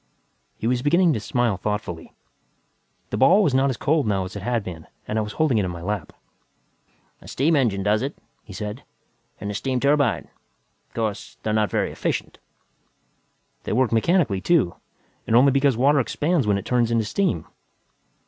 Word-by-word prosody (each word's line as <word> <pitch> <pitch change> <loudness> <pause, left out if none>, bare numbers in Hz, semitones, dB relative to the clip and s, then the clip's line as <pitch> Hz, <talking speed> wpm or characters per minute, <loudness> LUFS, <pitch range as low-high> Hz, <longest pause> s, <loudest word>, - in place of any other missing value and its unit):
He - - -6
was 125 +1 +1
beginning 170 +4 +3
to 115 - -1
smile 115 -1 0
thoughtfully. 95 -6 -4 1.0
The - - -1
ball 185 - +5
was 150 - +2
not 135 +1 +3
as 130 - -2
cold 150 -4 +1
now 100 -2 +1
as 90 - -9
it 100 - -5
had 120 +1 -1
been 85 -4 -8 0.2
and 110 - -1
I - - +1
was 105 -1 -5
holding 145 -8 +2
it - - +1
in 90 - -2
my 85 -1 -7
lap. 100 -3 -3 1.1
"A - - -14
steam 155 +5 +1
engine 110 -9 +1
does 105 +2 +2
it," 140 +2 -4 0.3
he 105 - -13
said, 105 +5 -6 0.6
"and 100 - -4
a - - -5
steam 130 +4 -1
turbine. 140 -1 +2 0.6
Of - - -35
course, 110 -3 -3
they're 110 - -1
not 110 -1 +2
very - - -1
efficient." - - -3 1.2
"They - - -3
work 125 +1 +2
mechanically, 115 - +2
too, 150 - +2 0.5
and 115 - +2
only 135 +3 +6
because 135 -2 +2
water 140 +3 +4
expands 145 +1 0
when 100 -1 +3
it 100 - -6
turns 120 -2 +1
to 115 -1 +1
steam." 105 - -1
115 Hz, 185 wpm, -23 LUFS, 105-140 Hz, 1.2 s, only